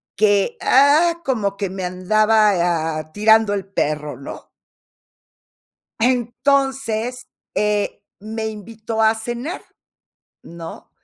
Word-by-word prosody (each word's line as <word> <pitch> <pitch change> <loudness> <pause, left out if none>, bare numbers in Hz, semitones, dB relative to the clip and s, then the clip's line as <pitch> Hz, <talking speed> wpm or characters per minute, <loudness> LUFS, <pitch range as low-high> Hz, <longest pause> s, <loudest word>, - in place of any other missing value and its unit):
que, 205 +1 +2
ah, 310 +6 +4
como 210 -7 -1
que 200 -2 -3
me 190 0 -5
andaba, 185 -4 +2
ah, 155 0 -7
tirando 220 0 +4
el 195 -2 -3
perro, 150 -4 -2
¿no? 140 - -10 1.5
Entonces, 250 -1 0 0.3
eh, 210 -1 -1 0.2
me 220 +2 -5
invitó 220 +1 -6
a 220 0 +4
cenar, 240 +8 -5 0.8
¿no? 165 -1 -10
215 Hz, 100 wpm, -20 LUFS, 195-240 Hz, 1.5 s, ah